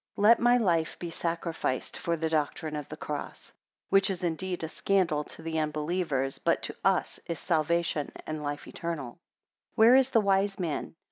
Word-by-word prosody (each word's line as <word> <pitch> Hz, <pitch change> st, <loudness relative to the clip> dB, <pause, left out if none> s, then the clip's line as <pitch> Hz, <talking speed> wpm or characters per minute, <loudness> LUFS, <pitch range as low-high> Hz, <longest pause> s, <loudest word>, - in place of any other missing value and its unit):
7 200 Hz, -, -2 dB
Let 225 Hz, +2 st, +7 dB
my 240 Hz, +1 st, +5 dB
life 170 Hz, -8 st, +1 dB
be 170 Hz, -1 st, -6 dB
sacrificed 165 Hz, -6 st, -2 dB
for 170 Hz, 0 st, -1 dB
the 160 Hz, 0 st, -1 dB
doctrine 155 Hz, 0 st, -1 dB
of 150 Hz, -2 st, -5 dB
the -, -, -7 dB
cross; -, -, -6 dB, 0.4 s
which 195 Hz, +1 st, +4 dB
is 185 Hz, -2 st, -3 dB
indeed 175 Hz, +1 st, -2 dB
a -, -, -1 dB
scandal 165 Hz, -3 st, +1 dB
to 165 Hz, -, -7 dB
the 160 Hz, 0 st, -2 dB
unbelievers, 150 Hz, -3 st, -1 dB
but -, -, +1 dB
to -, -, -4 dB
us -, -, +1 dB
is 170 Hz, -, -3 dB
salvation 165 Hz, -2 st, 0 dB
and 155 Hz, -1 st, -4 dB
life 145 Hz, 0 st, -4 dB
eternal. 150 Hz, -8 st, -5 dB, 0.5 s
8 -, -, -39 dB
Where 230 Hz, +3 st, +8 dB
is 265 Hz, 0 st, +5 dB
the 230 Hz, -, +4 dB
wise 195 Hz, 0 st, +2 dB
man? 165 Hz, -3 st, -3 dB
170 Hz, 185 wpm, -29 LUFS, 155-190 Hz, 0.5 s, Where